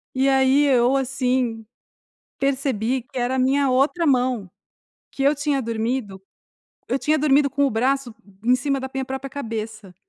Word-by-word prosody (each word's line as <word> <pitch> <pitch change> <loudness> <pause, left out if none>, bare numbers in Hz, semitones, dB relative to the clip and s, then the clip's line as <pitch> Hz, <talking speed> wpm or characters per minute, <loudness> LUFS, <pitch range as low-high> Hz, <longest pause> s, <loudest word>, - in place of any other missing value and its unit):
E 265 +1 +2
aí 270 +1 +4
eu, 255 -1 +3
assim, 255 -3 -1 0.7
percebi 265 -3 -1
que 265 +2 -8
era 245 +2 0
a - - -1
minha 270 +1 +2
outra 285 +7 +1
mão, 250 - +1 0.6
que 275 - -5
eu 280 +2 +4
tinha 290 -1 -1
dormido 225 -3 -3 0.7
eu 260 - +1
tinha 305 +3 +1
dormido 280 -1 +3
com 280 +2 +1
o - - 0
braço 255 +1 0 0.3
em 245 +2 +3
cima 275 0 -1
da 265 - -5
minha 265 0 -2
própria 265 +1 -5
cabeça. 220 -7 -6
265 Hz, 160 wpm, -22 LUFS, 240-275 Hz, 0.7 s, aí